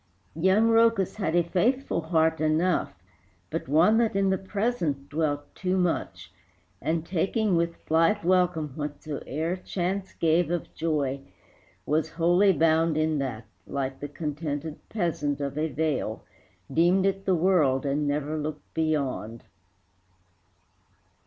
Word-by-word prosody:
Young 190 +7 +3
Rhœcus 225 -4 +3
had 175 -6 -1
a 175 - +4
faithful 205 +5 0
heart 160 -1 +1
enough, 155 - +1 0.6
But 165 -3 -3
one 170 - +4
that 230 -4 +1
in 195 -1 +2
the 190 - +2
present 190 - -2
dwelt 145 -2 -2
too 185 0 -1
much, 180 -2 -2 0.5
And, 160 0 -1
taking 195 +3 0
with 170 0 -1
blithe 165 +6 +2
welcome 175 -4 +2
whatsoe'er 150 +3 -4
Chance 190 +1 -3
gave 165 +1 +2
of 175 -1 -3
joy, 145 -4 -1 0.6
was 155 +2 0
wholly 175 +4 +4
bound 160 -1 +2
in 155 -1 +1
that, 120 -5 -4 0.2
Like 135 -1 -3
the 145 - -5
contented 150 0 -4
peasant 160 -8 -1
of 140 -1 -3
a 155 +1 0
vale, 145 -7 -2 0.5
Deemed 175 +4 +3
it 195 0 -1
the 190 - +3
world, 155 -7 +2
and 145 +1 0
never 150 +2 -1
looked 150 0 -6
beyond. 140 -8 -2
160 Hz, 130 wpm, -26 LUFS, 150-185 Hz, 0.6 s, a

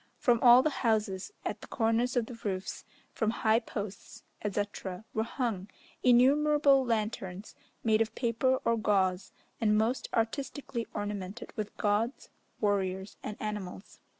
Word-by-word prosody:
From 240 -2 +3
all 245 +1 +8
the 310 - +2
houses, 210 - 0
at - - -3
the - - -10
corners 235 +2 +1
of 235 - +2
the 245 - -9
roofs, 190 -2 -3 0.3
from 220 - 0
high 220 0 +3
posts, 205 -4 -7 0.2
etc., 205 -1 -3
were 220 - +1
hung 225 -5 -2 0.3
innumerable 275 +3 +5
lanterns, 210 -4 -3 0.3
made 220 -1 +3
of 225 - -1
paper 255 +2 +1
or 230 0 +3
gauze, 190 -3 +1 0.3
and 210 -1 +3
most 225 +4 0
artistically 235 +1 -2
ornamented 205 +1 -5
with 215 -2 -5
gods, 215 +5 0 0.3
warriors, 190 -2 -1
and 210 - -6
animals. 210 -2 -6
220 Hz, 135 wpm, -30 LUFS, 205-240 Hz, 0.3 s, all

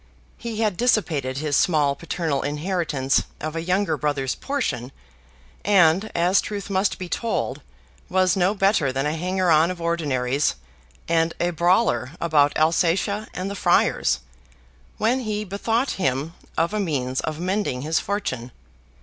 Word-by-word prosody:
He 230 -1 -4
had 210 -5 +1
dissipated 160 - +1
his 150 0 -1
small 150 -4 +3
paternal 160 -2 -2
inheritance 150 -3 0
of 155 +1 -4
a 165 - -2
younger 180 -1 0
brother's 145 -3 -1
portion, 235 - -3 0.7
and, 190 0 +4
as 175 +3 +3
truth 205 -1 -5
must 190 +1 +1
be 185 - -6
told, 230 +5 -2 0.5
was 185 -1 +3
no 190 +2 +2
better 195 -8 +2
than 135 +2 -1
a 150 +1 0
hanger 180 +1 0
on 160 +2 +5
of 180 -1 -5
ordinaries, 145 -5 0 0.5
and 165 0 +1
a 175 +1 +1
brawler 175 - +2
about 150 -3 +3
Alsatia 175 +6 +1
and 185 +1 -3
the 200 - -4
Friars, 130 - +2 0.8
when 235 +4 +2
he 215 -3 -2
bethought 225 +6 -1
him 140 +2 0 0.2
of 170 +5 +1
a 215 - 0
means 130 -9 -1
of 155 0 -4
mending 185 -8 -1
his 160 +2 +1
fortune. 185 - -3
170 Hz, 145 wpm, -23 LUFS, 150-200 Hz, 0.8 s, on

